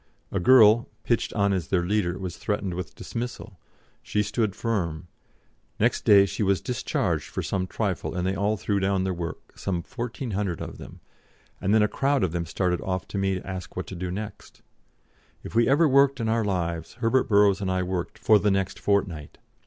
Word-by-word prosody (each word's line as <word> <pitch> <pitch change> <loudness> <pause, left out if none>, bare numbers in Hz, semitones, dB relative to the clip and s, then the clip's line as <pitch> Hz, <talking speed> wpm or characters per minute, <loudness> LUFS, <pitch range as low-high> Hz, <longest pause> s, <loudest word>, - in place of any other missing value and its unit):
A 100 - 0
girl, 115 +2 +6
pitched 120 - 0
on 100 -1 +2
as 90 -5 -2
their 90 -2 +1
leader, 95 -2 0
was 90 -2 -5
threatened 105 -3 -2
with 90 -3 -6
dismissal; 115 -4 -6 0.4
she 105 - 0
stood 105 -1 -1
firm; 90 -8 -2 0.7
next - - +1
day 100 -1 +7
she 100 - -4
was 100 -2 +2
discharged 125 -3 -1
for - - -4
some 95 -1 -2
trifle, 100 -4 -2
and 90 0 -1
they 95 - +1
all 100 +2 0
threw 100 +1 -1
down 95 0 +1
their 95 0 -1
work, 85 -1 -7
some 90 -3 -2
1,400 110 - -4
of - - -7
them, - - -11 0.6
and 95 - 0
then 110 0 +5
a - - +3
crowd 135 +1 +1
of 90 - +1
them 85 -1 -3
started 90 +1 -1
off 95 -1 -3
to 100 - -3
me 95 0 +1
to 90 - -7
ask 95 -2 -6
what 90 - -3
to 95 - -8
do 90 +1 -4
next. 105 +3 -7 0.8
If - - -8
we 115 +2 +3
ever 150 +4 +5
worked 140 -1 +4
in 115 - -1
our 115 0 +1
lives, 85 -5 -2
Herbert 125 +2 +1
Burrows 100 -1 +4
and 95 - -1
I 95 0 0
worked 90 -1 -3
for 110 -1 +4
the 105 - +2
next 95 -1 -1
fortnight. 90 -7 -1
100 Hz, 200 wpm, -26 LUFS, 90-110 Hz, 0.8 s, day